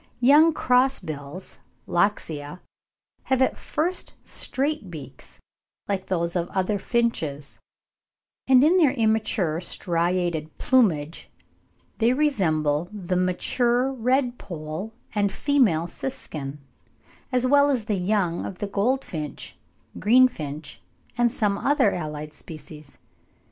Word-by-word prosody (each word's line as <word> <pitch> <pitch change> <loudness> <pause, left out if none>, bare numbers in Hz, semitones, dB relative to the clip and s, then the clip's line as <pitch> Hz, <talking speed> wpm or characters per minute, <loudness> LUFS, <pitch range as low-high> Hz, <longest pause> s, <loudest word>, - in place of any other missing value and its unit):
Young 295 +6 +6
cross 260 -2 +2
bills 155 +1 -7 0.3
(Loxia) 170 -4 -1 0.7
have 265 -1 +1
at 260 - +2
first 345 +5 -2
straight 280 - -2
beaks 145 -6 -10 0.5
like 190 -2 -2
those 170 -2 -1
of 175 -1 -1
other 195 +2 -1
finches, 160 - -2 0.9
and 260 0 +6
in 335 +5 +5
their 300 -7 +4
immature 220 - +1
striated 170 -3 -1
plumage 170 - +1 0.7
they 235 +2 +4
resemble 170 - +1
the 185 -4 -3
mature 240 +8 +1
red 250 0 0
pole 160 +4 -6 0.2
and 205 -2 +1
female 235 - +2
siskin, 150 - -6 0.7
as 250 -1 +1
well 285 +2 +5
as 250 -6 0
the 215 - -1
young 185 -2 0
of 185 - -6
the 205 - -3
goldfinch, 200 - -2 0.4
greenfinch, 160 - +2 0.4
and 240 -1 +2
some 205 -4 0
other 280 -7 +3
allied 150 -2 -5
species. 150 -2 -11
200 Hz, 110 wpm, -24 LUFS, 160-250 Hz, 0.9 s, Young